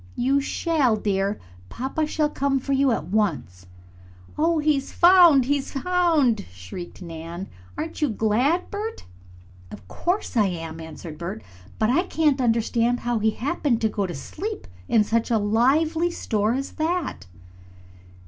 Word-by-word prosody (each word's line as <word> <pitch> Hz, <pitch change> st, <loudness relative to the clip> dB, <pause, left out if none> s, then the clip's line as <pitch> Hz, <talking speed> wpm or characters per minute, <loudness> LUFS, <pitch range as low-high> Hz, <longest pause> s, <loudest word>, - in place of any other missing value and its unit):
"You 275 Hz, +3 st, +2 dB
shall, 285 Hz, -5 st, +1 dB
dear. 200 Hz, -1 st, -1 dB, 0.3 s
Papa 270 Hz, +5 st, -2 dB
shall 300 Hz, 0 st, +1 dB
come 275 Hz, -1 st, 0 dB
for 275 Hz, +1 st, -2 dB
you 275 Hz, 0 st, +3 dB
at 225 Hz, -, -1 dB
once." 150 Hz, -, -1 dB, 0.7 s
"Oh, 330 Hz, +2 st, +2 dB
he's 295 Hz, -3 st, +1 dB
found! 345 Hz, -7 st, +6 dB
He's 280 Hz, 0 st, -1 dB
found!" 315 Hz, -, +2 dB
shrieked 95 Hz, -, -9 dB
Nan. 170 Hz, +2 st, -7 dB, 0.3 s
"Aren't 325 Hz, +1 st, -5 dB
you 300 Hz, -, +2 dB
glad, 240 Hz, -, +1 dB
Bert?" 430 Hz, +2 st, -5 dB, 0.6 s
"Of 90 Hz, -, -12 dB
course 355 Hz, -, -2 dB
I 215 Hz, -4 st, +4 dB
am," 165 Hz, -3 st, -5 dB
answered 160 Hz, 0 st, -9 dB
Bert. 170 Hz, -, -5 dB, 0.3 s
"But 220 Hz, +2 st, +2 dB
I 305 Hz, +7 st, +3 dB
can't 310 Hz, -7 st, +1 dB
understand 235 Hz, +1 st, +1 dB
how 240 Hz, -1 st, 0 dB
he 220 Hz, +1 st, +2 dB
happened 265 Hz, +1 st, -1 dB
to 220 Hz, -, +2 dB
go 200 Hz, -2 st, -2 dB
to 175 Hz, -, -6 dB
sleep 410 Hz, -, -6 dB, 0.2 s
in 220 Hz, -, +4 dB
such 225 Hz, +2 st, 0 dB
a 230 Hz, -, +3 dB
lively 280 Hz, +11 st, +2 dB
store 215 Hz, -9 st, -1 dB
as 275 Hz, +1 st, -3 dB
that." 325 Hz, -, -2 dB
245 Hz, 150 wpm, -24 LUFS, 205-310 Hz, 0.7 s, found